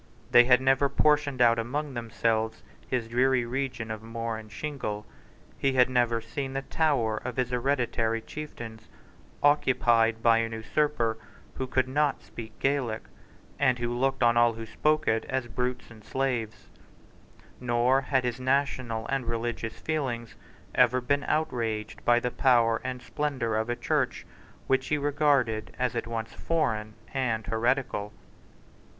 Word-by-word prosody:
They 120 - +8
had 125 0 +5
never 135 +1 +3
portioned 145 -2 +2
out 115 -1 +5
among 140 +5 -3
themselves 115 -1 -1 0.2
his 125 -3 -1
dreary 125 +1 +2
region 125 -3 -3
of 110 -1 -5
moor 115 0 -4
and 110 -1 -9
shingle. 110 -6 -4 0.5
He 135 -1 +2
had 125 -1 +4
never 120 -2 +2
seen 135 +4 -5
the 135 0 -2
tower 135 -9 +1
of 125 +1 -5
his 125 -1 0
hereditary 120 -3 0
chieftains 115 -4 -8 0.6
occupied 120 -6 +3
by 115 -1 +5
an 115 0 -2
usurper 115 -1 0 0.3
who 130 - -4
could 130 0 +1
not 145 +1 0
speak 110 -1 -10
Gaelic, 135 -5 0 0.6
and 130 -3 +3
who 120 0 -2
looked 135 +1 +1
on 120 0 +4
all 120 0 +5
who 115 0 -7
spoke 155 +7 0
it 110 0 +2
as 130 -2 -2
brutes 125 +1 -3
and 110 -1 -14
slaves; 120 -2 -2 0.9
nor 125 +2 +2
had 135 -2 +1
his 125 0 -2
national 130 -4 0
and 135 -1 -2
religious 115 -1 -3
feelings 130 -7 -3 0.4
ever 125 0 +4
been 140 +3 0
outraged 115 -8 -2
by 120 0 +4
the 125 0 -2
power 115 -4 +3
and 130 -1 -5
splendour 130 -3 -2
of 110 +2 -1
a 120 - 0
church - - -1 0.4
which 135 0 +1
he 150 - +1
regarded 140 -6 +1
as 125 -2 -1
at 115 - -2
once 115 -1 -4
foreign 110 -10 -1 0.2
and 120 -5 -1
heretical. 115 -3 0
120 Hz, 150 wpm, -28 LUFS, 115-135 Hz, 0.9 s, They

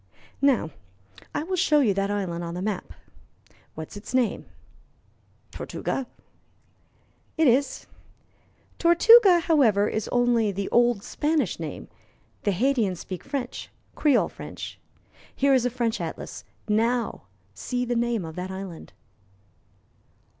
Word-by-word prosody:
Now, 265 - +2 0.6
I - - 0
will 370 +3 -2
show 300 -4 +3
you 220 -7 +3
that 195 +1 -1
island 185 -4 -2
on 170 0 -5
the 180 - -4
map. 205 -3 -3 0.8
What 160 0 -7
is - - -10
its 225 +5 -6
name?" 250 -4 0 1.0
"Tortuga." 270 -2 -4 1.3
"It 320 - +4
is. 260 +3 +2 0.9
'Tortuga,' 355 +2 +7
however, 235 - +3
is 215 -1 -2
only 240 -3 +2
the 195 0 -3
old 240 -4 +3
Spanish 295 - -1
name; 160 -2 -6 0.6
the 205 - +3
Haytians 215 -2 +1
speak 185 -2 -7
French 270 -3 -5 0.2
Creole 295 -4 +3
French. - - -9 0.6
Here 275 0 +3
is 250 -2 +3
a - - -1
French 235 -2 -1
atlas: - - -6 0.2
now 225 - 0 0.3
see 250 - -3
the 245 0 -1
name 235 -5 0
of 160 -1 -8
that 180 +1 -4
island." 190 -3 -8
235 Hz, 125 wpm, -25 LUFS, 195-275 Hz, 1.3 s, Tortuga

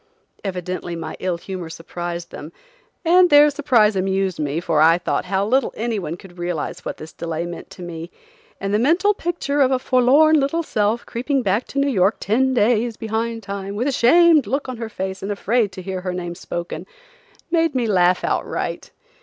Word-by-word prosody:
Evidently 180 -2 -4
my 165 -1 -6
ill 180 -2 -1
humor 180 -1 -7
surprised 170 +1 -6
them, 155 - -9 0.5
and 360 +2 +6
their 295 0 +7
surprise 245 -8 +3
amused 190 -1 0
me, 150 +1 -1
for 165 -3 +1
I 165 +2 +6
thought 175 - -2
how 190 +1 0
little 255 +3 +1
anyone 210 -8 -3
could 180 -1 -15
realize 175 -3 -3
what - - -5
this 155 0 -10
delay 165 0 -4
meant 175 -1 -8
to 180 - -10
me, 170 -1 -7 0.5
and 195 +1 -2
the 210 - +3
mental 345 - +3
picture 335 -6 -2
of 260 - +5
a 260 - +2
forlorn 275 +5 +4
little 285 +5 0
self 220 -3 0
creeping 265 +3 -1
back 205 +4 0
to - - -8
New 280 - +2
York 200 -6 +2
ten 260 +5 +1
days 230 0 +2
behind 225 0 -3
time, 200 0 -5
with 240 +6 -1
a - - +2
shamed 310 +3 +5
look 275 +6 -2
on 255 -2 -5
her 225 -1 -5
face 190 -2 -5
and 195 - -3
afraid 215 +1 0
to 185 - -8
hear 190 0 -4
her 180 -1 -3
name 175 -1 -4
spoken, 175 0 -6 0.6
made 330 -3 +2
me 250 -2 +1
laugh 180 -4 +3
outright. - - -2
205 Hz, 190 wpm, -21 LUFS, 180-260 Hz, 0.6 s, their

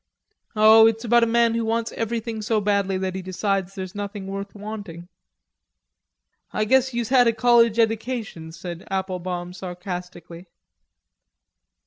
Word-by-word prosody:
"Oh, 220 +1 +7
it's 225 +1 -1
about 235 +1 +4
a 230 - +3
man 235 0 +3
who 230 0 -1
wants 225 +1 -1
everything 225 -1 -3
so 215 +1 0
badly 200 -2 0
that 185 0 -3
he 190 - -4
decides 195 +1 -2
there's 185 -2 -6
nothing 205 -1 -6
worth 195 +1 -6
wanting." 200 -5 -8 1.4
"I 215 - -1
guess 260 +3 +3
youse 235 -2 -3
had 250 -2 +5
a 230 - +3
college 235 -1 +4
edication," 225 -7 -2
said 170 +1 -8
Applebaum 180 -2 -3
sarcastically. 180 -1 -8
205 Hz, 135 wpm, -23 LUFS, 185-225 Hz, 1.4 s, Oh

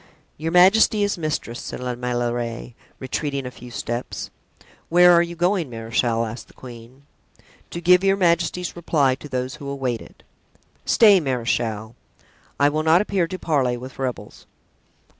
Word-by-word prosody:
"Your 160 +2 -4
majesty 195 +4 +5
is 205 - 0
mistress," 155 -7 -4
said - - -7
La 125 0 -3
Meilleraie, 120 -1 -3 0.2
retreating 140 +1 -3
a 125 - -5
few 125 0 -12
steps. 120 +1 -5 0.6
"Where 175 +1 +6
are 170 - +6
you 170 0 -4
going, 175 -2 0
marechal?" 115 0 -1
asked 115 +1 -8
the - - -22
queen. 125 +2 -13 0.7
"To 170 - -6
give 180 +2 +4
your 195 0 +3
majesty's 180 0 0
reply 150 -6 +1
to 145 +3 -9
those 130 +2 -3
who 140 -2 -7
await 130 -4 -3
it." - - -16 0.6
"Stay, 210 -4 +6
marechal; 115 -5 -2 0.6
I 140 - +5
will 155 +2 0
not 160 +3 +4
appear 195 -4 0
to 185 +2 -6
parley 135 -8 0
with 130 +2 -10
rebels." 130 -2 -5
140 Hz, 155 wpm, -22 LUFS, 120-170 Hz, 0.7 s, Where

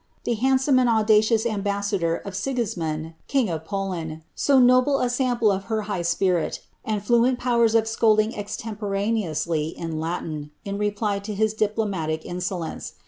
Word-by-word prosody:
the 240 - 0
handsome 265 +3 +3
and 250 -1 +3
aui 215 -1 +5 0.2
ambassador 200 -5 0
of 195 +1 -7
Si!,'ismund. 175 -11 -2
king 265 -7 +1
of 160 -1 -4
Poland, 175 -5 -4 0.3
«o 275 - +7
notable 255 +2 +5
a 245 - +1
sample 245 -5 +2
high 205 -2 -3
Bpirii 170 0 +1 0.3
and 210 -3 -2
fluent 240 +3 +3
powers 235 -2 +2
of 225 -1 +3
scolding 220 -1 +3
extcniporaneotistv 200 -7 -2
in 160 -2 -4 0.7
L - - -3
reply 205 0 0
to 205 +1 -6
his 215 +1 +1
diplomatic 200 -8 -1
insolence. 180 -1 -4
210 Hz, 135 wpm, -24 LUFS, 180-230 Hz, 0.7 s, o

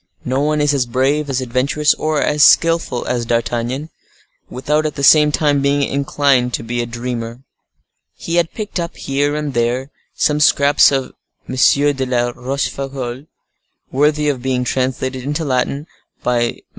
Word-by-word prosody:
No 130 +1 -1
one 150 +1 +1
is 145 0 +2
as 130 -4 0
brave, 140 +5 0
as 130 -1 -1
adventurous, 130 +4 +1
or 155 -1 -1
as 150 0 +2
skillful 165 -8 +3
as 120 -1 -1
D'Artagnan, 120 +5 -2 0.6
without 150 +4 -1
at 150 - -6
the 140 - -5
same 150 +1 +6
time 145 -2 +1
being 140 +1 +1
inclined 140 -3 +1
to - - -6
be 120 +1 -2
a 120 - -4
dreamer. 120 0 -5 0.7
He 170 +1 -3
had 170 -1 +1
picked 210 -4 -4
up, 170 -1 -5
here 145 +2 -1
and 150 -2 -3
there, 120 +3 -1 0.2
some 150 -1 +1
scraps 145 -1 +4
of 135 -2 -2 0.3
M. 130 - -5
de 140 +1 +3
la 120 -1 0
Rochefoucault, 135 +1 -4 0.6
worthy 150 +2 +1
of 135 -4 -1
being 130 -1 -1
translated 130 +1 -2
into 150 +5 -3
Latin 140 +2 -1 0.4
by 120 -1 +1
MM. - - -10
135 Hz, 160 wpm, -17 LUFS, 125-150 Hz, 0.7 s, same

